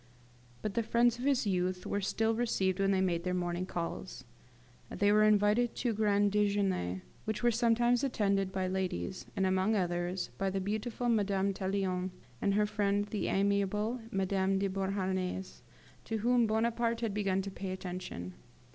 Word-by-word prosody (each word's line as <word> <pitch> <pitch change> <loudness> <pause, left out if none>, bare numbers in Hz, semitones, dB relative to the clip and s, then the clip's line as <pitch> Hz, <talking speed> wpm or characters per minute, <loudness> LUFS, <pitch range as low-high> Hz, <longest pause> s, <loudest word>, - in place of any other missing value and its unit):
But 215 - -2
the 230 - +1
friends 235 +1 +2
of 250 - -4
his 275 -4 +2
youth 185 -1 -1
were 205 - -1
still 220 +3 +1
received 195 -5 0
when 195 0 +2
they 190 -1 +2
made 170 -3 0
their 180 0 -1
morning 175 0 -2
calls. 175 +2 -5 0.7
They 205 0 +2
were 210 +1 +5
invited 215 +3 +3
to 240 -2 0
grand 205 -1 +2
dejeuners, 200 - +1 0.2
which 220 +1 -3
were 240 - +5
sometimes 240 +1 +2
attended 200 -7 +1
by 190 -1 -1
ladies; 185 - -3
and, 190 - +1
among 190 +3 +2
others, 175 -1 -1
by 195 0 +1
the 195 +1 -1
beautiful 215 +5 -2
Madame 200 -3 +1
Tallien 190 -1 -1 0.3
and 200 -1 +2
her 210 0 +3
friend 205 -1 0
the 210 - -2
amiable 200 +4 +1
Madame 195 -2 +1
de 195 +1 +1
Beauharnais, 190 -1 -2 0.4
to 225 - -2
whom 240 +1 +3
Bonaparte 230 +1 0
had 225 -4 -1
begun 195 -2 0
to 195 - -5
pay 190 0 -5
attention. 180 - -5
200 Hz, 165 wpm, -32 LUFS, 185-220 Hz, 0.7 s, were